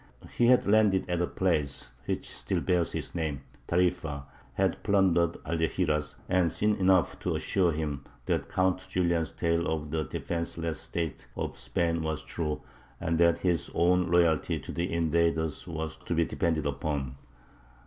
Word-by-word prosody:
He 120 - +3
had 125 0 +5
landed 100 -3 +4
at 90 - +1
the 90 - +1
place 70 -8 -1
which - - -2
still - - -2
bears 90 -3 +1
his - - -4
name, 75 -5 -2 0.2
Tarīfa, 85 -5 0 0.3
had - - +1
plundered 90 -4 +3
Algeciras, 80 -2 0
and 90 -3 +2
seen 105 0 +2
enough 95 -2 +3
to - - -1
assure 90 -3 +2
him 75 -3 -3 0.2
that - - -1
Count 95 0 +1
Julian's 85 -4 +1
tale 85 0 0
of 75 -2 -2
the 80 -1 0
defenceless 85 +3 -3
state 80 -7 -4
of - - -3
Spain 85 -1 -1
was 80 -1 -2
true, 75 -3 -3 0.4
and 80 0 0
that 85 -1 +5
his 85 -6 0
own 90 +1 +3
loyalty 85 -3 +3
to - - -7
the 85 +3 -2
invaders 80 -1 +1
was 80 -2 -4
to 85 - -3
be 85 0 +3
depended 80 -2 0
upon. 70 -2 -2
85 Hz, 155 wpm, -29 LUFS, 80-90 Hz, 0.4 s, had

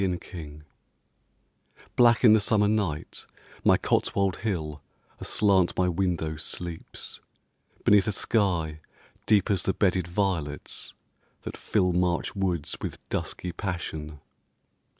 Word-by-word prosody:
THE 95 - +2
MIDLANDS 80 -4 -6 1.3
Black 120 0 +5
in 110 -3 +8
the 110 - +6
summer 105 0 +3
night 100 -8 -2 0.4
my - - +5
Cotswold 95 -2 +1
hill 80 -9 -3 0.4
Aslant 95 -4 +2
my 90 - +3
window 85 -3 -1
sleeps, 85 +1 -6 0.6
beneath 100 -1 +5
a - - +2
sky 90 -8 0 0.5
Deep 105 -2 +4
as 95 -3 +2
the 95 - -1
bedded 90 -3 +2
violets 85 -6 -2 0.5
that - - -6
fill 90 -4 +1
March 90 -1 0
woods 90 -6 -1
with - - -4
dusky 90 - -3
passion. 80 -5 -5
90 Hz, 115 wpm, -27 LUFS, 80-100 Hz, 1.3 s, in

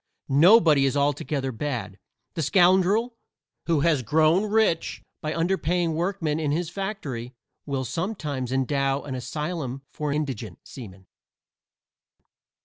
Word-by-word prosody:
Nobody 155 -1 +6
is 135 - -1
altogether 140 -1 0
bad; 120 -5 -4 0.3
the 165 - -3
scoundrel 190 - +3 0.5
who 165 -4 +2
has 155 -4 +2
grown 155 - +3
rich 215 -6 +1 0.2
by 155 - -3
underpaying 170 0 0
workmen 165 -2 -1
in 155 -2 -1
his 165 +2 -2
factory 155 - -5 0.3
will 135 -2 -2
sometimes 150 - -3
endow 135 +1 0
an 135 - -6
asylum 135 +1 -4
for 150 -1 -3
indigent 130 - -3
seamen. 95 -7 -11
150 Hz, 115 wpm, -25 LUFS, 135-175 Hz, 0.5 s, Nobody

